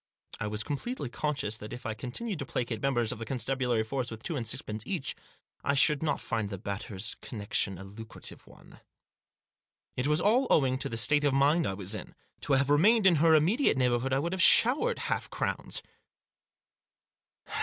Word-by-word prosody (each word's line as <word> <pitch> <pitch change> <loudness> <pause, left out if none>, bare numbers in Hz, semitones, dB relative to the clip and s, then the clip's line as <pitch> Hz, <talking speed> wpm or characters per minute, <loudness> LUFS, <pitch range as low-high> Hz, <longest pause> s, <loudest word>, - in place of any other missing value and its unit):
I 105 - -2
was 105 +1 -1
completely 145 - -4
conscious 120 -3 -2
that 105 0 -9
if 125 0 -8
I 110 - -2
continued 165 - -4
to 140 - -4
placate 115 -4 -3
members 120 -5 +1
of - - -6
the 115 - -5
con 135 - -2
stabulary 125 -1 0
force 125 +1 -3
with 110 0 -9
two 165 - -3
and 120 -5 -1
sixpence 110 0 -3
each 165 -9 -3 0.5
I 140 - +1
should 145 +1 +3
not 150 -3 0
find 110 -3 -3
the 100 - -5
Batters' 100 +2 -5
connection 100 -3 -2
a 95 - -9
lucrative 105 +3 -8
one. - - -17 1.2
It 125 +2 -1
was 150 +1 +2
all 235 +8 +3
owing 130 -3 +3
to - - -3
the 115 - -4
state 145 +5 +3
of 140 -2 +2
mind 145 +5 +3
I 95 - -2
was 100 +1 -2
in. 105 - -7 0.2
To 145 - -1
have 140 +1 +2
remained 205 +9 +4
in 180 -4 +6
her 160 +1 +5
immediate 175 - +3
neighbourhood 125 0 +1
I 135 - +2
would 170 +6 -2
have 190 - 0
showered 305 - +6
half - - -2
crowns. - - -3
130 Hz, 190 wpm, -29 LUFS, 110-150 Hz, 1.2 s, in